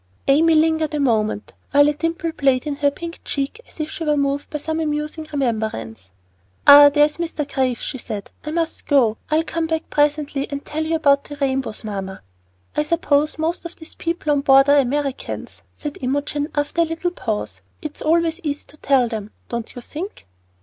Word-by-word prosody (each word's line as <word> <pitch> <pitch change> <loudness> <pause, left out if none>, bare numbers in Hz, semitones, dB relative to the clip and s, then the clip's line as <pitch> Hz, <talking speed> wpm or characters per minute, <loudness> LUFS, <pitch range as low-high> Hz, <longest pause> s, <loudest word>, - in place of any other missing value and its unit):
Amy 320 +4 +5
lingered 315 -1 +2
a - - -1
moment, 220 -5 0 0.2
while 285 0 +5
a 295 - +2
dimple 330 +2 -2
played 270 -4 +1
in 290 -2 -3
her 285 0 +3
pink 335 +4 -8
cheek 280 +11 -3
as - - -17
if 310 0 -3
she - - -5
were 300 -1 +2
moved 280 0 -1
by 300 - -3
some 315 +2 -3
amusing 305 0 -2
remembrance. 215 - -2 0.6
"Ah, 285 0 +10
there's 295 +1 +3
Mr. 325 -4 -3
Graves," 260 -4 -1
she 260 - -4
said. 210 -4 -6
"I 300 - -5
must 330 +1 -2
go. 240 -7 +3
I'll 315 +1 +2
come 330 0 -2
back 320 0 -3
presently 290 -1 +1
and 280 -1 -5
tell 310 +1 -2
you 320 +1 0
about 280 -3 +3
the 290 - -8
rainbows, 270 -5 -2
mamma." 195 -3 -5 0.5
"I - - +2
suppose 300 -2 +1
most 325 +3 -1
of 340 0 -8
these 320 - -11
people 335 -2 -2
on 285 -1 +2
board 270 0 +6
are 285 0 +7
Americans," 275 +1 -2
said 295 -1 -6
Imogen 285 +3 -1
after 290 +3 0
a - - +4
little 330 +2 -2
pause. 220 -11 -4 0.2
"It's 305 -1 -6
always 330 +1 +2
easy 290 -3 -3
to 305 - -16
tell 265 -4 +3
them, 215 -2 -5 0.2
don't 235 -1 -5
you 245 - -8
think?" 360 - -7
290 Hz, 190 wpm, -21 LUFS, 270-315 Hz, 0.6 s, Ah